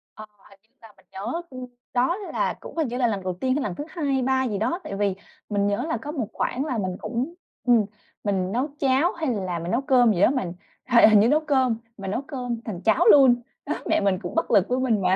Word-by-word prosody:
Ờ, 215 - -9 0.2
hình 200 - -19
như - - -46
là 225 - -13
mình 190 - -25
nhớ 190 - -9 0.7
đó 260 +10 +2
là 410 - -2
cũng - - -11
hình 315 -5 +1
như 245 - -4
là 245 -2 +2
lần 200 -4 -2
đầu 185 - -2
tiên 260 -1 +1
hay 290 - -1
lần 190 -4 -3
thứ - - -5
hai 330 -3 -4
hay 270 -2 +1
ba 260 +1 +1
gì 210 -4 -2
đó, 250 - -1
tại 195 - -5
vì 200 -2 0 0.3
mình 205 -1 +1
nhớ 205 +6 -1
là - - 0
có 295 - -6
một 260 -9 -3
khoảng 265 +4 -2
là 255 -6 -2
mình 185 -3 -2
cũng 245 +8 -3 0.3
ừm, 235 -3 +5 0.4
mình 190 -2 -1
nấu 255 +6 0
cháo 275 +6 +3
hay 315 -7 -1
là 185 -5 -3
mình 170 +2 -4
nấu 245 - +1
cơm 250 -5 +4
gì 180 - -1
đó - - +6
mình 190 -11 -2 0.4
hình 235 -3 +7
hình 215 - +6
như 215 - +5
nấu 295 +5 +4
cơm 265 -6 +1 0.2
mà 195 -2 -7
nấu 210 +7 -1
cơm 250 -5 -5
thành 190 -5 -5
cháo 220 -2 +3
luôn. 260 -4 +6 0.2
Đó, 300 - -1 0.2
mẹ - - +3
mình 195 -2 +1
cũng 175 - -6
bất - - 0
lực 195 -1 +4
với 250 +1 +1
mình 230 -6 +1
mà. 185 +1 +3
235 Hz, 260 wpm, -24 LUFS, 200-265 Hz, 0.7 s, hình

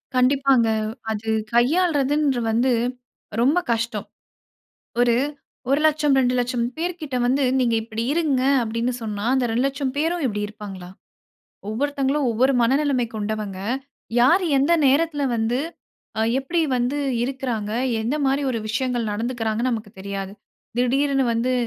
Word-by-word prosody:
கண்டிப்பாங்க. 260 -1 +4 0.4
அது 220 +1 -4 0.2
கையாள்றதுன்ற 290 0 +2
வந்து 240 +4 +2 0.7
ரொம்ப 285 +8 +4
கஷ்டம். 225 -2 -3 0.9
ஒரு 240 -1 +4 0.5
100000 300 0 +3
200000 245 -1 +1
பேர்க்கிட்ட 330 -5 -3
வந்து 265 +3 +2
நீங்க 240 -3 +2
இப்படி 225 0 -4
இருங்க, 300 -5 +1 0.2
அப்படின்னு 230 +2 -1
சொன்னா 210 -2 -4
அந்த 260 -2 +2
200000 270 +4 0
பேரும் 330 +2 0
இப்படி 210 -4 -1
இருப்பாங்களா? 200 -4 -9 0.8
ஒவ்வொருத்தவங்களும் 280 +3 0
ஒவ்வொரு 255 +5 +2
மனநிலைமை 265 +1 +2
கொண்டவங்க 210 -2 -3 0.6
யாரு 335 +10 +5
எந்த 280 +5 +3
நேரத்தில 290 +2 +2
வந்து, 230 +2 0 0.6
அ - - +1 0.2
எப்படி 330 +6 -1 0.2
வந்து 250 +4 0 0.3
இருக்குறாங்க. 245 -5 -3 0.3
என்ன 235 +6 -1
மாரி 270 +1 +1
ஒரு 230 - -2
விஷயங்கள் 240 0 -1
நடந்துக்குறாங்கன்னு 230 +1 -1
நமக்கு 220 -3 -4
தெரியாது. 195 0 -5 0.5
திடீருன்னு 270 +2 +2
வந்து 240 +3 0
255 Hz, 115 wpm, -23 LUFS, 225-280 Hz, 0.9 s, யாரு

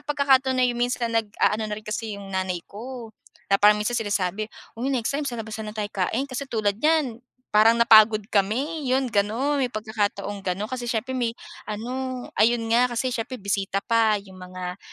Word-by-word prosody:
pagkakataon 270 -3 +3
na 255 - +4
yung 240 -1 0
minsan 245 -1 0
nag-aano 220 -1 +1
na 210 - -2
rin 215 - -10
kasi 215 0 -4
yung 200 -1 -9
nanay 185 -2 -2
ko 235 +1 -9 0.4
na 195 - +4
parang 210 +1 +7
minsan 210 +3 -1
sinasabi, 205 -1 -1 0.3
"Uy 250 +3 -1
next 255 -4 0
time 285 +1 -2
sa 240 - -5
labas 220 -1 -6
na 215 - -5
lang 215 - -13
tayo 210 -1 -3
kain", 210 +7 0
kasi 275 0 -5
tulad 210 -4 0
niyan 300 -7 +2 0.3
parang 215 +2 +6
napagod 220 -2 +6
kami 265 +10 0
'yon 260 0 +1
gano'n. 230 +8 +1
May 265 - +2
pagkakataong 210 -3 -3
gano'n 195 +2 -3
kasi 250 -2 -4
siyempre 250 +2 -2
may 235 -2 -1 0.3
ano, 250 +4 -4 0.2
ayun 235 +1 +4
nga 240 +2 +5
kasi 255 +2 0
siyempre 245 -1 -4
bisita 195 0 -1
pa 230 -2 +3
yung 190 -2 -14
mga 180 0 -7
225 Hz, 190 wpm, -24 LUFS, 205-255 Hz, 0.4 s, parang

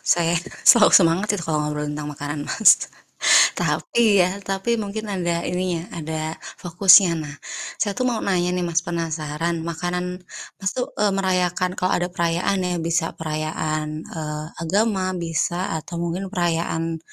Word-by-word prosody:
saya 170 -1 +2 0.4
selalu 235 -4 +6
semangat 170 +3 +2
sih - - -5
kalau 155 -1 0
ngobrol 150 0 -3
tentang 150 0 -5
makanan, 145 +1 -5
Mas. 220 - +5 0.7
Tapi 220 -4 +2
ya, 180 0 +3
tapi 195 +3 -2
mungkin 210 +2 -5
ada 175 -2 -1
ininya, 180 -2 -2
ada 160 0 -4 0.3
fokusnya. 180 +1 +6
Nah, 145 -1 -8 0.4
saya 205 -2 0
tuh 255 - 0
mau 235 - -1
nanya 180 -2 +1
nih, 180 - -1
Mas, 170 -1 +1
penasaran, 165 -1 -2
makanan 175 +2 -3 0.5
Mas 195 -1 -1
tuh, 250 0 -1
eee, 205 -2 +2
merayakan 185 -1 0
kalau 185 - 0
ada 175 - -1
perayaan 170 +3 0
ya, 180 - -1
bisa 170 0 +1
perayaan, 155 0 -2 0.3
eee, 150 0 -4 0.2
agama, 195 +3 +1
bisa 170 0 -1 0.2
atau 165 +3 -9
mungkin 175 +3 -3
perayaan 165 -1 -1
175 Hz, 145 wpm, -22 LUFS, 160-190 Hz, 0.7 s, selalu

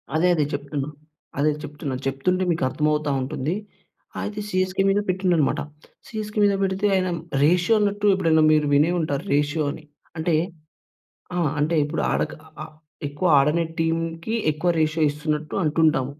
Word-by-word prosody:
అదే 175 +3 +3
అదే 150 -3 +1
చెప్తున్నా. 145 0 -3 0.5
అదే 150 +2 +3
చెప్తున్నా. 145 -2 -5
చెప్తుంటే 180 +8 0
మీకు 165 - -1
అర్థమవుతా 150 0 0
ఉంటుంది. 150 +5 -2 0.7
అయితే 210 0 -4
సీఎస్‌కే 185 0 0
మీద 200 +1 +3
పెట్టిం‌డనమాట. 180 -5 +1 0.5
సీఎస్‌కే 215 -1 -4
మీద 200 -1 +4
పెడితే 190 +1 -1
ఆయన 185 -1 +1 0.3
రేషియో 180 +7 +4
అన్నట్టు 205 0 0
ఎప్పుడైనా 165 -4 +3
మీరు 150 -1 +3
వినే 150 +4 +4
ఉంటారు. 145 -2 -2
రేషియో 150 +1 +1
అని. 155 - -10 0.4
అంటే 160 0 +1 1.0
ఆ! - - 0 0.2
అంటే 155 +3 +1
ఇప్పుడు 155 +2 -2
ఆడక - - -1 0.3
ఆహ్, 155 0 -11 0.3
ఎక్కువ 145 +6 -2
ఆడనట్టి 165 +4 +1
టీమ్‌కి 165 +5 -1 0.2
ఎక్కువ 165 +4 0
రేషియో 155 +1 +1
ఇస్తున్నట్టు 150 +1 -3
అంటుంటాం. 155 -4 +2
160 Hz, 140 wpm, -23 LUFS, 150-185 Hz, 1.0 s, మీద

